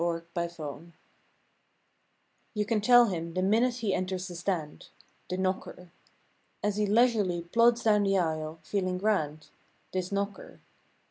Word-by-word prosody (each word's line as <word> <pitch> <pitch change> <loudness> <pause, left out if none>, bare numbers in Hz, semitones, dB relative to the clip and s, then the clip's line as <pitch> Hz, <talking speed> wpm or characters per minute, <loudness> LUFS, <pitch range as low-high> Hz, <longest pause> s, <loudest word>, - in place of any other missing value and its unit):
THE 170 -1 -1
KNOCKER 170 -1 -5 1.6
You 210 0 0
can 215 0 0
tell 245 +2 +7
him 170 -5 -4
the 185 - 0
minute 230 +5 +3
he 220 -5 -1
enters 185 0 -2
the 180 - -8
stand— 170 -4 -4 0.4
The 185 - -2
knocker. 185 -1 -3 0.7
As 205 0 0
he 210 -1 +1
leisurely 210 -6 +2
plods 235 +6 +3
down 210 -2 +4
the 195 -1 +2
aisle—feeling 165 +3 -2
grand. 155 -7 -1 0.4
This 185 0 -3
knocker. 200 0 -4
185 Hz, 130 wpm, -29 LUFS, 170-210 Hz, 1.6 s, tell